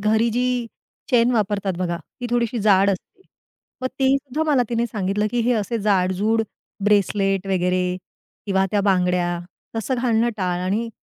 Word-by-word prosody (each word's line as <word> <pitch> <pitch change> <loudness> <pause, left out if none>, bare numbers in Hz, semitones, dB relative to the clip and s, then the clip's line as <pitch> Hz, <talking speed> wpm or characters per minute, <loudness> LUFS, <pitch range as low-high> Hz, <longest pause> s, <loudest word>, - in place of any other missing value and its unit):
घरी 220 +3 +2
जी 245 +3 0 0.7
चैन 240 -1 +4
वापरतात 200 -3 0
बघा, 175 -2 -1 0.2
ती 245 - -2
थोडीशी 240 -1 0
जाड 200 -1 +5
असते. 200 - -6 0.6
मग 255 - 0
तेही 265 0 +4
सुद्धा 275 +2 -3
मला 265 -4 +4
तिने 235 0 0
सांगितलं, 205 -1 -1
की 245 - 0
हे 240 +2 +2
असे 225 +1 -1
जाड-जूड 205 +2 +1 0.4
ब्रेसलेट 195 -1 +2
वगैरे 180 -1 +1 0.6
किंवा 190 -1 +2
त्या 205 - +2
बांगड्या 180 -3 +1 0.4
तसं 225 +4 -1
घालणं 235 -1 +2
टाळ 180 -2 -1
आणि 215 +5 -1
210 Hz, 150 wpm, -22 LUFS, 190-235 Hz, 0.7 s, जाड